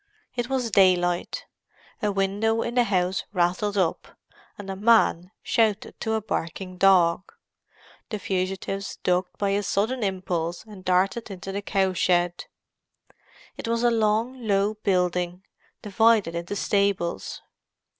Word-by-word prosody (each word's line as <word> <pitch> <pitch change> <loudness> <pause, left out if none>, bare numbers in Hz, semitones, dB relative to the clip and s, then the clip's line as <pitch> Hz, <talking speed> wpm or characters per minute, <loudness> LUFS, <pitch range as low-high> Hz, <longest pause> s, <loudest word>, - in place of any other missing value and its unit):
It 240 0 -2
was 255 -4 -1
daylight; 180 -3 +2 0.6
a 210 - +1
window 200 +3 0
in 235 - -3
the 245 -1 +3
house 185 -2 0
rattled 185 +3 0
up, 180 -4 0 0.5
and 205 - -9
a - - -4
man 200 -4 +3
shouted 220 -2 +1
to 220 - -1
a 220 - 0
barking 185 -1 -4
dog. 185 -2 +4 0.8
The 215 - -3
fugitives 195 0 -3
ducked 180 0 0
by 200 - 0
a 200 +1 +1
sudden 220 +6 -1
impulse, 185 -4 -2
and 210 -4 -13
darted 190 +5 +1
into 195 0 -7
the 200 +1 -3
cow 195 -2 0
shed. 175 -1 +1 1.1
It - - -6
was 230 +1 0
a 240 - +4
long, 225 +2 0
low 200 +1 +2
building, 180 -3 -1 0.4
divided 215 -3 +3
into 170 +4 -4
stables. 200 - -1
195 Hz, 135 wpm, -25 LUFS, 180-215 Hz, 1.1 s, dog